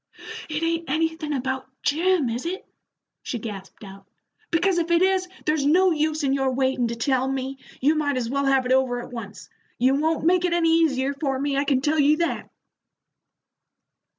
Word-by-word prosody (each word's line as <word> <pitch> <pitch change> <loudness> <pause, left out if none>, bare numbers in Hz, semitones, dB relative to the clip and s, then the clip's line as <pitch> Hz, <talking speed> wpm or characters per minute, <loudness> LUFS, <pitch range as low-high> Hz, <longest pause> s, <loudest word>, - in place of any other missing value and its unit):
"It 305 +1 -2
ain't 330 -1 -1
anythin' 320 +1 -1
about 265 -1 -2 0.2
Jim, 330 0 +2
is 235 +2 -3
it?" 375 +3 -5 0.6
she 245 - -4
gasped 205 -3 -8
out. 195 -1 -12 0.4
"Because 345 +2 +2
if 335 0 -2
it 340 +1 +4
is, 380 -1 +2 0.2
there's 305 -1 +1
no 360 +6 +4
use 310 -1 0
in 270 -1 +2
your 270 -1 +1
waitin' 260 -1 0
to 235 - -4
tell 260 +2 0
me, 265 0 -3 0.2
you 290 +4 +3
might 290 -3 0
as 240 -2 -2
well 280 +3 -1
have 270 -1 +3
it 250 - -1
over 260 -2 +2
at 245 - -9
once. 215 -4 -8 0.3
You 255 +2 +3
won't 315 +3 0
make 360 +1 +3
it 355 -1 +1
any 330 -1 +3
easier 275 -3 +1
for 275 -1 -2
me, 280 +1 -1
I 280 +1 +1
can 270 -2 +1
tell 305 +3 +1
you 295 +2 +4
that." 340 0 -2
280 Hz, 190 wpm, -24 LUFS, 260-325 Hz, 0.6 s, it